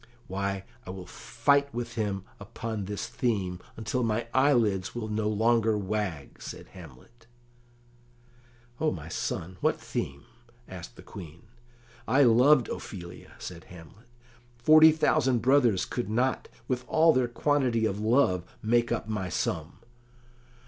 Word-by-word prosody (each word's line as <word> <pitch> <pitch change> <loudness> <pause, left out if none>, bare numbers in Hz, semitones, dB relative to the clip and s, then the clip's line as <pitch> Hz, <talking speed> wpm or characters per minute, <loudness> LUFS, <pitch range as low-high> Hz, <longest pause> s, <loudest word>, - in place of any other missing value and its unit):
"Why, 100 0 -3 0.2
I - - -11
will 95 -1 -7
fight 140 - +1
with 120 0 -4
him 100 -4 -2 0.2
upon 105 +1 -5
this 105 +1 -4
theme, 95 -7 -1 0.2
until 115 +3 -2
my 115 0 0
eyelids 120 -9 +2
will 110 -2 -4
no 105 0 0
longer 110 0 +2
wag," 100 -7 -4
said - - -8
Hamlet. 90 - -15 1.5
"O 155 - +2
my 80 -1 -7
son, 90 +2 -4
what - - +1
theme?" 70 +2 -4 0.4
asked 85 -10 -9
the - - -13
Queen. 85 -4 -11 0.6
"I 140 +2 +5
loved 125 +2 +5
Ophelia," 90 -3 -8
said 90 -2 -8
Hamlet; 90 +6 -14 0.5
"forty 155 +5 +7
thousand 135 -5 +2
brothers 125 -7 +4
could 120 -4 -4
not, 125 +4 0 0.2
with 125 -1 -1
all 160 0 +5
their 130 -1 +2
quantity 120 -2 +1
of 100 -2 -1
love, 110 -5 +2 0.2
make 120 +2 +2
up 120 - -1
my 100 -4 -3
sum." 80 +2 -3
110 Hz, 135 wpm, -28 LUFS, 95-125 Hz, 1.5 s, forty